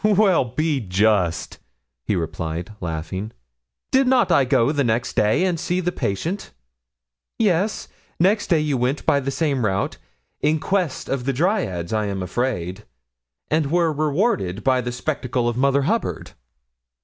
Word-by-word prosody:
'Well, 200 -7 +4
be 150 +4 -1
just,' 100 -4 +1 0.5
he 105 - 0
replied, 85 +1 -3
laughing; 90 +5 -4 0.6
'did 265 0 +4
not 250 -7 +3
I 140 -5 +5
go 130 0 +3
next 120 -5 0
day 110 +10 +3
and 175 -3 0
see 175 +2 -1
the 180 -1 0
patient?' 165 - -3 0.9
'Yes; 205 -1 +1 0.3
next 200 +5 +3
day 165 -4 +3
you 150 -3 0
went 125 +4 -1
by 140 - +4
the 135 0 -3
same 140 -3 0
route 100 -1 -1 0.4
in 155 +1 +2
quest 185 -4 -1
of 130 -2 -2
the 135 - +1
dryads, 125 - 0
I 110 -1 0
am 95 -2 -3
afraid 95 -2 -2 0.7
and 155 -2 +2
were 170 -1 +2
rewarded 150 - 0
by 130 -1 +3
the 125 0 -3
spectacle 125 -2 -2
of 120 - 0
Mother 140 +2 +2
Hubbard.' 225 +10 -1
135 Hz, 150 wpm, -22 LUFS, 105-170 Hz, 0.9 s, I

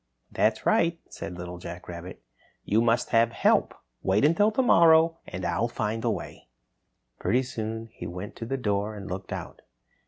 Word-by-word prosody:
"That's - - +1
right," 165 0 +3
said 90 - -7
Little 90 0 -7
Jack 85 +1 -8
Rabbit. 90 +1 -8 0.4
"You 110 +3 +3
must 120 +1 +2
have 115 0 +4
help. - - +2 0.3
Wait 100 +8 +2
until 185 +8 +4
tomorrow 165 -8 +5
and - - -5
I'll - - +1
find 110 +2 -3
a 120 - +2
way." 100 - -5 0.7
Pretty 125 +2 +2
soon 115 -2 -4
he - - -7
went 90 +3 -7
to 115 - -6
the 135 +2 -1
door 105 -3 -1
and 100 -2 -8
looked 90 +1 -6
out. - - -6
110 Hz, 165 wpm, -27 LUFS, 95-135 Hz, 0.7 s, tomorrow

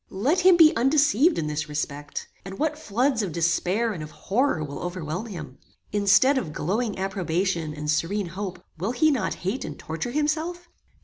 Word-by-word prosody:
"Let 265 - +1
him 365 -1 +6
be 320 -2 +7
undeceived 290 - +3
in 160 - -1
this 150 0 -3
respect, 145 -1 -4 0.2
and 195 0 -8
what 310 0 0
floods 250 0 +1
of 195 -5 -3
despair 180 +7 +1
and 170 - -6
of 155 - -7
horror 215 - 0
will 140 -1 -6
overwhelm 175 +3 -4
him! 155 - -8 0.3
Instead 210 +7 +4
of 160 -11 -6
glowing 210 +8 -1
approbation 185 -4 -1
and 150 0 -6
serene 170 +6 0
hope, 190 +1 -6
will 200 +8 -1
he 310 +5 +3
not 220 -9 -1
hate 200 +8 -1
and 150 - -6
torture 160 +9 -4
himself? 315 +5 -1
195 Hz, 175 wpm, -25 LUFS, 165-265 Hz, 0.3 s, be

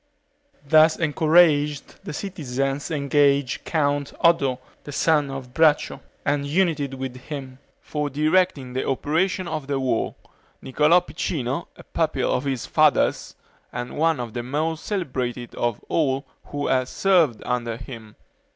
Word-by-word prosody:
Thus 155 +2 +5
encouraged, 155 -2 +2
the - - -5
citizens 140 -6 -3
engaged 140 -3 +1
Count 145 -3 0
Oddo 145 -7 +3 0.3
the 145 - -8
son 150 -1 +2
of 135 -2 -7
Braccio, 155 -1 +2 0.2
and 145 0 +1
united 150 -4 0
with 130 -1 -5
him, 130 -1 -8 0.2
for 150 -1 -3
directing 155 -2 +1
the 130 - -2
operations 170 +7 0
of 155 -4 -4
the 140 -1 -1
war, 130 -4 -1 0.4
Niccolo 150 +6 +3
Piccinino, 150 -4 -3
a - - -12
pupil 155 -5 -1
of 130 +2 -1
his 135 -4 -2
father's, - - +2 0.4
and 120 - -5
one 160 -2 +2
of 120 -3 -5
the 120 - -3
most 155 +6 -2
celebrated 125 - -3
of 120 -3 -2
all 140 -3 0 0.2
who 145 0 -4
had 130 -1 +1
served 170 - +2
under 120 -2 -2
him. 115 -4 -10
145 Hz, 135 wpm, -23 LUFS, 130-160 Hz, 0.4 s, Thus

